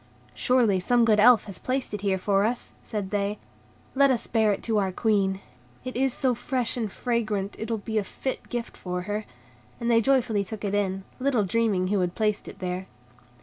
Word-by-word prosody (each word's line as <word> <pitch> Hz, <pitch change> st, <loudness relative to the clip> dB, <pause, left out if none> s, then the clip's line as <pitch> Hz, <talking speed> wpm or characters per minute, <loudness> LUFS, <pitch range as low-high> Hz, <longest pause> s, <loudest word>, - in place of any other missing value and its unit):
"Surely, 240 Hz, -7 st, +3 dB
some 240 Hz, +6 st, +3 dB
good 215 Hz, -2 st, +4 dB
Elf 230 Hz, 0 st, +7 dB
has 200 Hz, -3 st, -8 dB
placed 255 Hz, -3 st, -2 dB
it 210 Hz, -, -3 dB
here 195 Hz, -2 st, +1 dB
for 195 Hz, +1 st, +2 dB
us," 235 Hz, +3 st, -2 dB
said 205 Hz, -4 st, -4 dB
they; 205 Hz, 0 st, -1 dB, 0.6 s
"let 275 Hz, 0 st, +5 dB
us 250 Hz, -4 st, +1 dB
bear 220 Hz, -2 st, +2 dB
it 200 Hz, -, -3 dB
to 220 Hz, -2 st, +1 dB
our 190 Hz, -2 st, 0 dB
Queen; 195 Hz, -2 st, +1 dB, 0.5 s
it 255 Hz, -, -5 dB
is 265 Hz, +1 st, +2 dB
so 255 Hz, +1 st, +1 dB
fresh 245 Hz, 0 st, -1 dB
and 225 Hz, -5 st, -2 dB
fragrant 215 Hz, -5 st, -1 dB
it 220 Hz, -, -4 dB
will 225 Hz, -, 0 dB
be 220 Hz, +1 st, -2 dB
a -, -, -1 dB
fit 260 Hz, +6 st, -5 dB
gift 240 Hz, -1 st, -4 dB
for 180 Hz, -1 st, -4 dB
her"; 210 Hz, +2 st, -3 dB, 0.5 s
and 235 Hz, 0 st, 0 dB
they 230 Hz, 0 st, +5 dB
joyfully 235 Hz, -5 st, +2 dB
took 210 Hz, +1 st, -6 dB
it 200 Hz, -, -2 dB
in, 195 Hz, -2 st, 0 dB, 0.2 s
little 255 Hz, -4 st, +2 dB
dreaming 200 Hz, -3 st, +1 dB
who 205 Hz, 0 st, +2 dB
had 180 Hz, -1 st, -1 dB
placed 210 Hz, -2 st, 0 dB
it -, -, -9 dB
there. 185 Hz, +1 st, -4 dB
215 Hz, 205 wpm, -26 LUFS, 195-240 Hz, 0.6 s, Elf